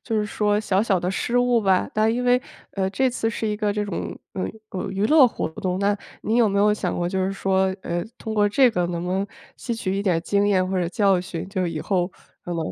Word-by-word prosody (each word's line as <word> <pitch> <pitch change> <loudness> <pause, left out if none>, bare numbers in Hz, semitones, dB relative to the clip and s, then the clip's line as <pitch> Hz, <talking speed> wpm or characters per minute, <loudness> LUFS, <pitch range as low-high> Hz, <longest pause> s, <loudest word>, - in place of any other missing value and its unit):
就 225 -3 -2
是 210 - 0
说 210 0 +1
小 205 -2 +1
小 200 -5 +2
的 180 +2 -2
失 240 +5 -1
误 245 -1 +3
吧。 190 -2 +2
但 215 +1 +2
因 250 +1 -1
为， 250 0 +4 0.3
呃， 190 -1 0
这 255 +7 +1
次 225 -2 -1
是 225 - -3
一 210 - 0
个 210 -1 0
这 210 0 -1
种， 200 -4 -5
呃， 190 -3 -3 0.3
呃， 190 +1 -4
娱 195 +2 0
乐 290 -3 +7
活 - - -3
动。 185 0 -1
那 200 +1 +2 0.3
你 225 +2 0
有 230 -3 +5
没 200 - 0
有 210 +1 +4
想 185 -4 -2
过 175 - -1
就 185 +1 0
是 190 - -1
说， 190 -1 +1 0.2
呃， 175 0 -2
通 220 - -5
过 205 -1 +3
这 255 +4 +4
个 180 -6 0
能 175 0 -3
不 180 - -3
能 195 +1 0 0.3
吸 235 - -4
取 195 -4 -2
一 200 - -1
点 180 -5 +2
经 200 +2 +1
验 185 -2 +2
或 185 -1 -1
者 170 - 0
教 195 0 +2
训， 175 -1 -6
就 185 -3 -1
以 165 -2 -3
后 180 -1 0 0.3
可 175 - -5
能 - - -2
200 Hz, 280 characters per minute, -23 LUFS, 185-220 Hz, 0.3 s, 乐